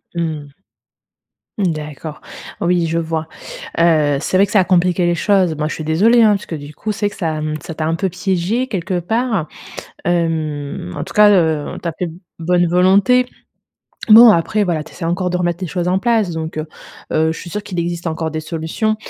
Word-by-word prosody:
Mmh 160 Hz, -3 st, -2 dB
mh. 145 Hz, -, -17 dB, 1.1 s
D'accord, 155 Hz, -4 st, -3 dB, 0.4 s
oui, 170 Hz, -1 st, +2 dB
je 165 Hz, -, -1 dB
vois. 160 Hz, -1 st, -2 dB, 0.5 s
Heu, 155 Hz, -4 st, +3 dB
c'est 185 Hz, -, 0 dB
vrai 200 Hz, -, +4 dB
que -, -, -10 dB
ça 210 Hz, -, +4 dB
a -, -, +2 dB
compliqué 180 Hz, -1 st, +2 dB
les 175 Hz, -, +2 dB
choses. 185 Hz, -2 st, +2 dB
Moi, 150 Hz, 0 st, -2 dB
je -, -, -4 dB
suis 155 Hz, -, -6 dB
désolée, 210 Hz, +10 st, +4 dB
hein, 215 Hz, -, +6 dB
parce 200 Hz, -, -7 dB
que 165 Hz, -, -4 dB
du 145 Hz, 0 st, -9 dB
coup, 215 Hz, +8 st, -4 dB
c'est 210 Hz, 0 st, -2 dB
vrai -, -, +2 dB
que -, -, -12 dB
ça 160 Hz, -4 st, -2 dB, 0.2 s
ça 160 Hz, -, -8 dB
t'a 155 Hz, -, -2 dB
un 160 Hz, -, 0 dB
peu 190 Hz, +3 st, -1 dB
piégé 190 Hz, +6 st, -1 dB
quelque 185 Hz, -4 st, -2 dB
part. 220 Hz, -2 st, -1 dB, 0.6 s
Hem, 155 Hz, -, -2 dB
en -, -, -4 dB
tout -, -, -8 dB
cas, 210 Hz, 0 st, +7 dB
heu, 160 Hz, -6 st, +1 dB
tu 170 Hz, -, -2 dB
as -, -, -2 dB
fait 180 Hz, -2 st, -2 dB, 0.3 s
bonne 175 Hz, +1 st, +2 dB
volonté. 195 Hz, +8 st, +4 dB, 0.8 s
Bon, 230 Hz, +2 st, +9 dB
après, 205 Hz, +5 st, +1 dB
voilà, 170 Hz, -5 st, -1 dB
tu -, -, -14 dB
essaies -, -, -8 dB
encore 180 Hz, +2 st, -1 dB
de 180 Hz, -, -2 dB
remettre 175 Hz, 0 st, -1 dB
les 185 Hz, -, -2 dB
choses 175 Hz, +2 st, -2 dB
en 185 Hz, -, +2 dB
place, 225 Hz, -3 st, +1 dB
donc 160 Hz, -1 st, -5 dB
heu, 155 Hz, +1 st, -3 dB, 0.4 s
heu, 160 Hz, +1 st, +2 dB
je -, -, -9 dB
suis 175 Hz, -, -9 dB
sûre 210 Hz, +4 st, -4 dB
qu'il 180 Hz, -3 st, -4 dB
existe 170 Hz, 0 st, -3 dB
encore 160 Hz, 0 st, -2 dB
des 155 Hz, -, -3 dB
solutions. 160 Hz, +7 st, -2 dB
175 Hz, 215 wpm, -18 LUFS, 160-195 Hz, 1.1 s, Bon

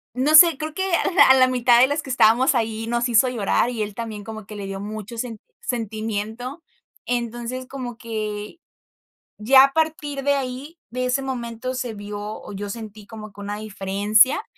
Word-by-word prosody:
no 280 Hz, +5 st, +1 dB
sé, 330 Hz, -3 st, +8 dB
creo 310 Hz, 0 st, -5 dB
que 380 Hz, +2 st, -2 dB
a 360 Hz, -, +2 dB
la 355 Hz, -, +6 dB
a -, -, +9 dB
la 255 Hz, -1 st, +5 dB
mitad 245 Hz, -1 st, +4 dB
de 255 Hz, -, +7 dB
los 290 Hz, +2 st, -1 dB
que 265 Hz, -, -10 dB
estábamos 255 Hz, +3 st, +4 dB
ahí 225 Hz, -1 st, -2 dB
nos 240 Hz, +1 st, 0 dB
hizo 235 Hz, +2 st, +4 dB
llorar, 235 Hz, 0 st, +1 dB
y 225 Hz, -3 st, -2 dB
él 205 Hz, -1 st, -6 dB
también 220 Hz, -3 st, -6 dB
como 220 Hz, -2 st, -9 dB
que 210 Hz, -, -9 dB
le 200 Hz, -1 st, -6 dB
dio 195 Hz, 0 st, -5 dB
mucho 215 Hz, +2 st, -7 dB
sen 230 Hz, -3 st, -5 dB, 0.2 s
sentimiento. 225 Hz, -, -4 dB, 0.4 s
Entonces, 240 Hz, +1 st, -3 dB
como 250 Hz, -4 st, -7 dB
que, 215 Hz, +4 st, -5 dB, 0.8 s
ya 265 Hz, +5 st, +7 dB
a 275 Hz, -, -4 dB
partir 300 Hz, -3 st, -1 dB
de 285 Hz, 0 st, +3 dB
ahí, 275 Hz, +4 st, -5 dB
de 255 Hz, +2 st, -3 dB
ese 250 Hz, +2 st, 0 dB
momento 255 Hz, -1 st, -4 dB
se 245 Hz, -3 st, -4 dB
vio 205 Hz, 0 st, -7 dB
o 210 Hz, 0 st, -7 dB
yo 205 Hz, +1 st, -5 dB
sentí 215 Hz, -2 st, -9 dB
como 215 Hz, -2 st, -10 dB
que 205 Hz, -, -15 dB
una 205 Hz, +1 st, -4 dB
diferencia 210 Hz, +3 st, +2 dB
235 Hz, 195 wpm, -22 LUFS, 215-260 Hz, 0.8 s, a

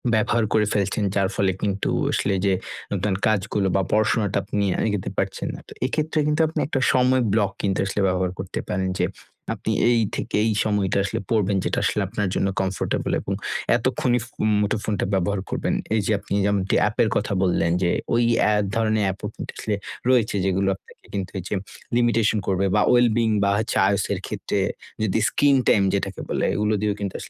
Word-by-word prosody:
ব্যবহার 110 Hz, +1 st, +2 dB
করে 110 Hz, -1 st, +3 dB
ফেলছেন। 100 Hz, +1 st, 0 dB
যার 100 Hz, -1 st, +2 dB
ফলে 95 Hz, -2 st, +2 dB
কিন্তু 100 Hz, -1 st, -1 dB, 0.2 s
আসলে -, -, 0 dB
এইযে 95 Hz, +1 st, +1 dB, 0.4 s
আপনার 95 Hz, 0 st, 0 dB
কাজগুলো 100 Hz, -1 st, +1 dB
বা, 95 Hz, -, +3 dB
পড়াশোনাটা 105 Hz, -1 st, +2 dB
আপনি 105 Hz, -, -1 dB, 0.2 s
এগোতে 105 Hz, -3 st, -2 dB
পারছেন -, -, -2 dB
না। -, -, -9 dB
তো -, -, -15 dB
এক্ষেত্রে 155 Hz, +4 st, -1 dB
কিন্তু 150 Hz, +2 st, +2 dB
আপনি 160 Hz, -, -3 dB
একটা 145 Hz, -, -1 dB
সময় 130 Hz, 0 st, +3 dB
ব্লক 105 Hz, -3 st, +2 dB
কিন্তু 95 Hz, -1 st, 0 dB
আসলে 100 Hz, +1 st, -1 dB
ব্যবহার 90 Hz, -1 st, 0 dB
করতে -, -, -4 dB
পারেন। 95 Hz, 0 st, -1 dB
যে -, -, +3 dB, 0.5 s
আপনি -, -, -3 dB, 0.2 s
এই 115 Hz, -1 st, +3 dB
থেকে -, -, -3 dB
এই 110 Hz, -, +2 dB
সময়টা 100 Hz, -3 st, 0 dB
আসলে 100 Hz, -, -2 dB
পড়বেন, 105 Hz, -3 st, +2 dB
যেটা -, -, 0 dB
আসলে 105 Hz, -, +1 dB
আপনার 105 Hz, 0 st, -2 dB
জন্য -, -, +1 dB
কমফোর্টেবল 95 Hz, -1 st, -2 dB
এবং -, -, -3 dB, 0.4 s
এতক্ষণই 125 Hz, -1 st, +1 dB
ফু -, -, -25 dB, 0.2 s
মুঠোফোনটা 105 Hz, 0 st, -1 dB
ব্যবহার 95 Hz, +1 st, +1 dB
করবেন। -, -, -1 dB, 0.2 s
এইযে 110 Hz, -1 st, 0 dB
আপনি 100 Hz, -, -6 dB, 0.2 s
এমন 100 Hz, -1 st, +1 dB
কি -, -, +3 dB
অ্যাপের 105 Hz, +1 st, +2 dB
কথা 105 Hz, 0 st, 0 dB
বললেন 85 Hz, -2 st, +2 dB
যে, 85 Hz, -1 st, +2 dB, 0.2 s
ওই 120 Hz, +1 st, +3 dB, 0.3 s
এক 105 Hz, -, +1 dB
ধরনের 110 Hz, -2 st, +1 dB
অ্যাপও 95 Hz, 0 st, -3 dB, 0.8 s
রয়েছে, 120 Hz, -5 st, +3 dB
যেগুলো 95 Hz, 0 st, +1 dB
আপনাকে -, -, -20 dB
কিন্তু 95 Hz, -2 st, -3 dB
ঐযে 95 Hz, +2 st, -3 dB, 0.4 s
লিমিটেশন 115 Hz, -2 st, +2 dB
করবে 95 Hz, 0 st, +1 dB
বা, 105 Hz, -, +4 dB
well-being 115 Hz, -2 st, +3 dB
বা, 100 Hz, -, +3 dB
হচ্ছে 110 Hz, 0 st, -1 dB
IOS 100 Hz, -1 st, +1 dB
এর -, -, -3 dB
ক্ষেত্রে -, -, -2 dB, 0.4 s
যদি 110 Hz, +1 st, +1 dB
স্কিন 145 Hz, -1 st, +3 dB
টাইম 100 Hz, -, +5 dB
যেটাকে 100 Hz, -1 st, -2 dB
বলে, -, -, 0 dB
এগুলো 105 Hz, +1 st, +1 dB
দিয়েও 105 Hz, -1 st, 0 dB
কিন্তু 100 Hz, -2 st, -4 dB
105 Hz, 180 wpm, -23 LUFS, 95-110 Hz, 0.8 s, টাইম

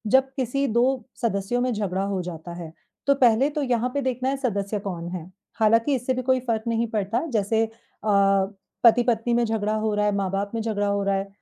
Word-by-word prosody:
जब 265 Hz, 0 st, +4 dB
किसी 270 Hz, +2 st, 0 dB
2 235 Hz, +1 st, +3 dB, 0.4 s
सदस्यों 220 Hz, +2 st, 0 dB
में 250 Hz, 0 st, +1 dB
झगड़ा 195 Hz, -3 st, -1 dB
हो 195 Hz, -1 st, -1 dB
जाता 170 Hz, -1 st, -7 dB
है, 165 Hz, -2 st, -7 dB, 0.4 s
तो 280 Hz, -, +5 dB
पहले 250 Hz, +1 st, +4 dB
तो 300 Hz, -1 st, -2 dB
यहाँ 250 Hz, -2 st, +1 dB
पे 285 Hz, -, 0 dB
देखना 255 Hz, 0 st, -1 dB
है, 275 Hz, -, -1 dB
सदस्य 210 Hz, -5 st, -2 dB
कौन 175 Hz, -4 st, -5 dB
है। 175 Hz, 0 st, -7 dB, 0.3 s
हालाँकि 230 Hz, +5 st, +4 dB
इससे 255 Hz, +1 st, -1 dB
भी 255 Hz, -, -2 dB
कोई 260 Hz, 0 st, +2 dB
फ़र्क 220 Hz, -2 st, 0 dB
नहीं 230 Hz, 0 st, +1 dB
पड़ता। 220 Hz, +6 st, -1 dB
जैसे 220 Hz, 0 st, +2 dB
अ, -, -, -11 dB, 1.1 s
पति-पत्नी 235 Hz, 0 st, +4 dB
में 235 Hz, 0 st, +3 dB
झगड़ा 215 Hz, -1 st, -1 dB
हो 215 Hz, 0 st, 0 dB
रहा 210 Hz, 0 st, +1 dB
है, 210 Hz, -, +3 dB
माँ 195 Hz, -1 st, 0 dB
बाप 200 Hz, +1 st, -2 dB
में 225 Hz, -, -1 dB
झगड़ा 210 Hz, -2 st, -1 dB
हो 200 Hz, 0 st, 0 dB
रहा 195 Hz, 0 st, +1 dB
है, 195 Hz, +1 st, -2 dB
225 Hz, 215 wpm, -24 LUFS, 200-245 Hz, 1.1 s, तो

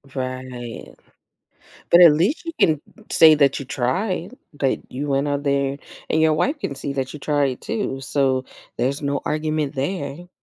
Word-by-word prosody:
Right. 130 Hz, -2 st, -6 dB, 1.0 s
But 175 Hz, +1 st, +8 dB
at 165 Hz, -3 st, +9 dB
least 190 Hz, -, +1 dB
you 330 Hz, -, -4 dB
can 155 Hz, -3 st, +3 dB, 0.3 s
say 160 Hz, -1 st, +7 dB
that 140 Hz, -2 st, +3 dB
you 140 Hz, -, -6 dB
tried, 180 Hz, -, -2 dB, 0.2 s
that 135 Hz, -, +1 dB
you 145 Hz, +3 st, -4 dB
went 140 Hz, +1 st, +1 dB
out 145 Hz, 0 st, -1 dB
there, 140 Hz, -1 st, 0 dB, 0.3 s
and 160 Hz, -, +1 dB
your 160 Hz, -1 st, +4 dB
wife 280 Hz, -, 0 dB
can 140 Hz, -, -3 dB
see 140 Hz, +1 st, -4 dB
that 130 Hz, -1 st, -3 dB
you 150 Hz, -, -8 dB
tried 140 Hz, -3 st, 0 dB
too, 205 Hz, -12 st, -3 dB
so 135 Hz, -1 st, 0 dB, 0.3 s
there's 135 Hz, +4 st, -1 dB
no 140 Hz, 0 st, -1 dB
argument 155 Hz, -1 st, -1 dB
there. 155 Hz, +3 st, -4 dB
140 Hz, 165 wpm, -22 LUFS, 135-160 Hz, 1.0 s, at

